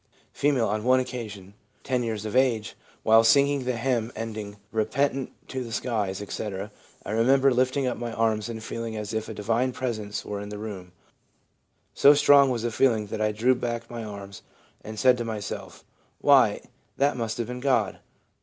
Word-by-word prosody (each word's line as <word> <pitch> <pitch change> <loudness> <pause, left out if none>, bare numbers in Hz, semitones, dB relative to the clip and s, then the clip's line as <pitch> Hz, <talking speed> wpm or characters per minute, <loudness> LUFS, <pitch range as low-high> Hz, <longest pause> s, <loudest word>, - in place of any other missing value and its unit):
' - - -37
F. - - -13
' - - +3
On 110 -2 0
one 130 +2 +4
occasion 105 -7 -6 0.3
(10 130 -2 0
years 110 -3 -3
of 110 - -4
age), 125 -5 +2 0.3
while 110 +1 +6
singing 140 +3 +4
the 125 -1 -1
hymn 120 -2 0
ending 110 -2 -6
" 105 - -40
Repentant 135 +4 -1 0.2
to 130 -1 -4
the 120 - -8
skies/' 105 -4 -2
etc., 100 0 -5 0.3
I - - -4
remember 130 +4 +4
lifting 130 +2 +1
up 125 - -1
my 120 -1 -4
arms 110 -1 0
and 110 -1 -6
feeling 115 0 -5
as 105 +1 -5
if 110 0 -3
a - - -5
Divine 115 +5 0
Presence 110 -5 -4
were 100 -1 -4
in 105 - -7
the 105 - -6
room; 100 -4 -7 1.0
so 145 +1 +7
strong 140 -1 +6
was 120 -3 -2
the 120 - -1
feeling 115 -3 +2
that 110 - -2
I 105 0 +2
drew 115 +5 +3
back 120 -1 -4
my 120 -1 -5
arms 100 -2 -8 0.4
and 110 0 -8
said 125 +2 +4
to - - -1
myself, 110 -3 -6 0.2
" - - -40
Why, - - +5 0.4
that 140 0 +2
must 115 -3 -3
have 120 - -1
been 125 +2 -6
God." 125 -7 +1
115 Hz, 195 wpm, -26 LUFS, 105-125 Hz, 1.0 s, so